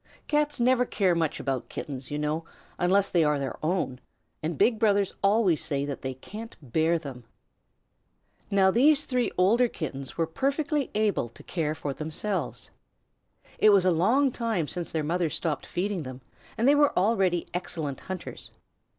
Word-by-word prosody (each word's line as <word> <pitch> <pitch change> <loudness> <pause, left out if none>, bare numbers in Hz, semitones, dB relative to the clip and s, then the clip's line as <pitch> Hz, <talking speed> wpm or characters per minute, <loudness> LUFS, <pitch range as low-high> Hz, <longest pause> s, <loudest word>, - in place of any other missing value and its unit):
Cats 295 -2 +1
never 250 +1 +4
care 195 -6 +1
much 165 -3 -1
about 135 -3 -3
Kittens, 135 -3 -6
you 145 - -3
know, 150 +2 -1 0.4
unless 195 +3 +3
they 170 -2 +4
are 150 -1 +2
their 135 +1 -5
own, 160 -6 -1 0.4
and 155 0 -3
big 225 - +3
brothers 200 -3 +2
always 200 -5 +3
say 140 -2 0
that 140 -2 -5
they 130 -1 -4
can't 215 - -9
bear 160 +5 +1
them. 135 -6 -8 1.3
Now 190 -1 +4
these 290 +7 +4
three 250 -2 0
older 225 +7 +4
Kittens 140 - -6
were 165 - +2
perfectly 280 - -1
able 210 - +1
to - - -15
care 155 -3 -2
for 145 -2 -4
themselves. 160 +8 -4 0.9
It 215 - +6
was 200 -3 +5
a 185 - +5
long 235 - +3
time 225 -10 -1
since 175 +2 -4
their 160 -2 -1
mother 170 +2 0
stopped 155 +1 -2
feeding 195 0 -2
them, 130 -2 -8 0.4
and 235 - +2
they 285 - +7
were 290 -1 +3
already 185 -3 +2
excellent 160 -5 -3
hunters. 185 -1 -7
180 Hz, 165 wpm, -27 LUFS, 150-220 Hz, 1.3 s, they